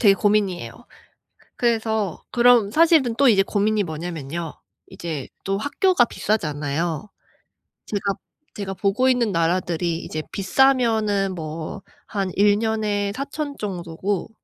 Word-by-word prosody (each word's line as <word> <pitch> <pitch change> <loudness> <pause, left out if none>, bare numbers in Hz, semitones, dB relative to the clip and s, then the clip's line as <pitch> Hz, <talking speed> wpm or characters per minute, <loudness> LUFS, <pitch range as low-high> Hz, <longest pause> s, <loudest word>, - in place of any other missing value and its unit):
되게 200 -4 +6
고민이에요. 205 -3 0 0.7
그래서 220 -6 0
그럼 240 -4 +5
사실은 310 -5 +4
또 280 - +5
이제 195 -5 +5
고민이 210 +1 +1
뭐냐면요. 165 -1 -5 0.3
이제 160 -6 -5 0.2
또 195 0 -1
학교가 285 - +2
비싸잖아요. 160 -3 -2 0.8
제가 205 - -2 0.5
제가 195 -2 -4
보고 210 +7 +1
있는 245 -4 +2
나라들이 170 0 0
이제 155 -2 -5
비싸면은 215 -3 +2
뭐 160 +3 -6 0.3
한 195 -3 -1
1년에 205 0 +2
4000 280 +2 -4
정도고 185 0 -3
205 Hz, 255 characters per minute, -23 LUFS, 175-225 Hz, 0.8 s, 되게